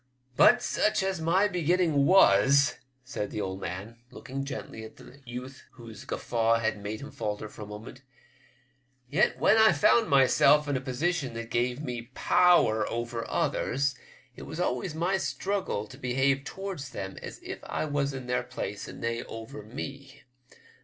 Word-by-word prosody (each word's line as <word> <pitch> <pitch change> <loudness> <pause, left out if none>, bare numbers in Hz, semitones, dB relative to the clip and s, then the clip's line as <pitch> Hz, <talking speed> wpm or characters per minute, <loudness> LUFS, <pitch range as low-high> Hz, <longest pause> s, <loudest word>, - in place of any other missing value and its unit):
'* - - -45
But, - - +6
such 210 -2 +1
as 190 -3 -2
my 180 +5 +3
beginning 170 -5 +2
was," 140 -7 +5 0.2
said 120 -6 -4
the - - -5
old 95 -1 -4
man, 100 +7 -6
looking 135 +1 -6
gently 135 -4 -7
at 110 - -11
the 140 - -15
youth 125 +2 -8
whose 115 -4 -11
guffaw 115 -1 +1
had 110 -2 -1
made 105 +2 -5
him 145 - -8
falter 105 0 -4
for 105 - -13
a 105 - -7
moment, 105 +5 -10 0.6
" 130 0 -40
yet 180 +9 +2
when 220 - +4
I 220 -2 +7
found 210 +9 +3
myself 140 +2 +5
in 145 - 0
a 130 - -1
position 135 0 -2
that 115 0 -6
gave 125 +4 0
me 120 -3 -5
power 175 -12 +4
over 120 0 -4
others, 140 +1 0 0.4
it - - -11
was 160 - -7
always 155 0 -1
my 175 +4 +1
struggle 190 - -2
to - - -13
behave 135 +2 +1
towards 190 -7 -6
them 95 -7 -6
as - - -8
if - - -6
I - - -3
was 145 -2 -1
in 135 -2 -7
their 125 0 0
place - - -6
and - - -9
they 115 0 -1
over 115 +2 -8
me. 135 +4 -8
130 Hz, 175 wpm, -28 LUFS, 115-150 Hz, 0.6 s, I